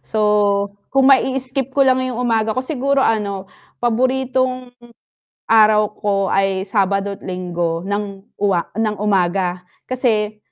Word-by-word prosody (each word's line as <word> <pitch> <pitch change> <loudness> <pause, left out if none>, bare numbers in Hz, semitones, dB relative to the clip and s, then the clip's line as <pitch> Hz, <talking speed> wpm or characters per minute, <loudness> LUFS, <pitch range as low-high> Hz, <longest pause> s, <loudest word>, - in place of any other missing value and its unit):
So 220 - -4 0.7
kung 270 0 +5
mai-skip 265 0 0
ko 275 - +5
lang 260 0 +3
'yong 255 -2 -3
umaga 225 -2 0
ko, 255 - -1
siguro 275 -1 0
ano, 200 -3 -1 0.4
paboritong 255 +1 0 0.8
araw 215 -1 +5
ko 205 -1 0 0.2
ay 195 -1 +1
Sabado't 200 0 -1
Linggo 175 -2 -3
ng 200 0 -4 0.2
uwa 190 -4 0
nang 215 -1 0
umaga. 180 -2 0 0.2
Kasi 215 -4 -1
215 Hz, 120 wpm, -19 LUFS, 195-255 Hz, 0.8 s, kung